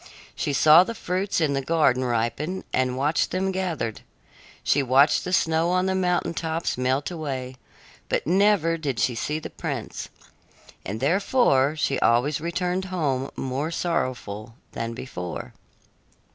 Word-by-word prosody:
She - - -1
saw 155 +4 +7
the 230 +4 -6
fruits 185 0 -1
in 155 -4 +1
the 135 - 0
garden 135 -4 +2
ripen 120 +9 -1
and 130 -1 +1
watched 145 +4 +1
them 190 +1 -1
gathered; 170 - -3 0.6
she 145 - +3
watched 135 +3 +4
the 180 - -4
snow 165 -1 +2
on 185 +1 +2
the 190 - +1
mountain 180 -2 0
tops 165 0 -2
melt 130 +5 0
away; 135 -6 -4 0.5
but - - 0
never 180 -1 +3
did 135 -6 -2
she 120 - +2
see 150 +6 -2
the 155 - -7
prince, - - -5 0.7
and 105 +4 -5
therefore 155 - +3
she 140 -3 0
always 125 +6 +2
returned 180 +2 -1
home 145 -8 -1
more 135 +4 -2
sorrowful 115 - -3 0.2
than 115 0 -4
before. 90 -9 -6
150 Hz, 145 wpm, -25 LUFS, 130-180 Hz, 0.7 s, saw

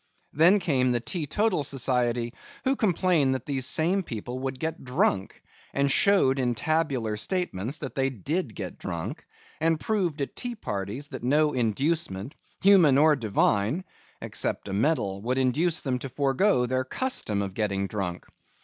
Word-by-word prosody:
Then 170 +7 +6
came 135 -9 +1
the 120 - +1
Teetotal 165 - -1
Society, 125 -3 0 0.3
who 265 +1 +2
complained 175 - +2
that 130 - -6
these 135 -3 -1
same 175 +5 +2
people 125 - -6
would 130 0 -4
get 160 +2 -3
drunk, 125 -6 0 0.3
and 140 0 +2
showed 135 -7 +4
in 125 -2 0
tabular 140 -7 0
statements 140 - -2
that 135 -3 -6
they 135 0 +1
did 135 - -3
get 95 -4 -6
drunk, 95 - -5 0.4
and 160 0 +2
proved 180 -8 -1
at 140 - -3
tea 245 -1 -4
parties 105 - -5
that 130 -4 -7
no 150 +5 +2
inducement, 130 - -1 0.3
human 180 -9 +6
or 155 +1 +5
Divine 110 - +1 0.4
(except - - -2
a 95 - -4
medal), 100 -4 0
would 125 +4 -1
induce 150 +6 +1
them 130 -3 -1
to 135 - -6
forego 135 - +2
their 130 +1 0
custom 130 - -1
of 95 -1 -5
getting 100 -2 -1
drunk. 95 -4 -4
135 Hz, 155 wpm, -26 LUFS, 115-160 Hz, 0.4 s, Then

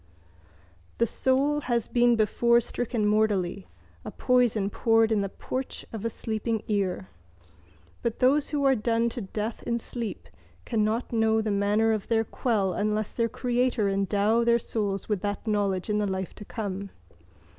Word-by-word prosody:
—The 235 - +3
soul 270 +5 +1
has 240 -4 -1
been 240 -1 +3
before 235 +2 +3
stricken 235 -1 -2
mortally, 205 -3 +1 0.4
a - - -6
poison 240 -6 +1
poured 225 0 +3
in 215 -2 +2
the 195 - -2
porch 260 +6 -5
of 220 - -5
a 230 - 0
sleeping 220 0 -3
ear. 190 - -1 0.9
But 235 -1 -2
those 280 +3 +3
who 290 -2 -1
are 270 - +6
done 230 0 +1
to 240 +1 -6
death 215 +3 -4
in 235 - -1
sleep 235 -1 -6 0.4
cannot 225 +1 0
know 220 -1 +3
the 220 -1 -1
manner 205 +3 +2
of 215 -2 -2
their 225 -1 +2
quell 210 -5 0
unless 210 +2 -1
their 230 -1 0
Creator 245 -3 0
endow 200 +3 +2
their 235 0 +4
souls 205 -4 -3
with 210 -4 -1
that 205 +2 -3
knowledge 200 -4 0
in 210 0 +1
the 205 - 0
life 190 -1 -3
to 210 - -11
come. 200 -3 -5
220 Hz, 160 wpm, -27 LUFS, 205-235 Hz, 0.9 s, are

